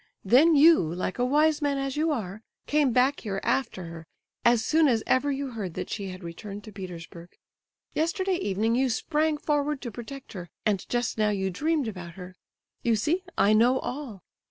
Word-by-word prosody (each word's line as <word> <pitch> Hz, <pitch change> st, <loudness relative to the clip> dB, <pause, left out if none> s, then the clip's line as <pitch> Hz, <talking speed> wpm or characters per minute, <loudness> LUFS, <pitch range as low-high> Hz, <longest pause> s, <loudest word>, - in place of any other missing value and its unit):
Then 285 Hz, -, +6 dB
you—like 185 Hz, -, +4 dB
a 245 Hz, -, +3 dB
wise 300 Hz, +3 st, +3 dB
man 285 Hz, -1 st, +1 dB
as 275 Hz, -1 st, -2 dB
you 310 Hz, +2 st, +1 dB
are—came 240 Hz, +5 st, -2 dB
back 255 Hz, +4 st, +3 dB
here 195 Hz, -3 st, -3 dB
after 230 Hz, -8 st, -1 dB
her 165 Hz, -1 st, -9 dB, 0.4 s
as 235 Hz, -2 st, +4 dB
soon 320 Hz, 0 st, +4 dB
as 230 Hz, -4 st, +2 dB
ever 280 Hz, +3 st, +2 dB
you 275 Hz, -1 st, -3 dB
heard 200 Hz, -7 st, -5 dB
that -, -, -5 dB
she 200 Hz, -2 st, -3 dB
had 185 Hz, 0 st, -8 dB
returned 200 Hz, +4 st, -8 dB
to 215 Hz, -, -10 dB
Petersburg. 175 Hz, -3 st, -9 dB, 0.6 s
Yesterday 370 Hz, +3 st, 0 dB
evening 220 Hz, -, 0 dB
you 260 Hz, +2 st, +2 dB
sprang 300 Hz, +6 st, 0 dB
forward 295 Hz, -1 st, 0 dB
to 240 Hz, -, -5 dB
protect 245 Hz, +4 st, -9 dB
her, 175 Hz, -4 st, -7 dB, 0.2 s
and 205 Hz, -4 st, 0 dB
just 240 Hz, -2 st, -1 dB
now 215 Hz, 0 st, +3 dB
you 190 Hz, -2 st, -1 dB
dreamed 300 Hz, -, 0 dB
about 180 Hz, -5 st, -7 dB
her. 185 Hz, -1 st, -10 dB, 0.5 s
You 230 Hz, -1 st, +2 dB
see, 310 Hz, -, 0 dB, 0.2 s
I 205 Hz, +2 st, +4 dB
know 240 Hz, +4 st, +4 dB
all. 250 Hz, -9 st, -6 dB
235 Hz, 180 wpm, -27 LUFS, 195-290 Hz, 0.6 s, Then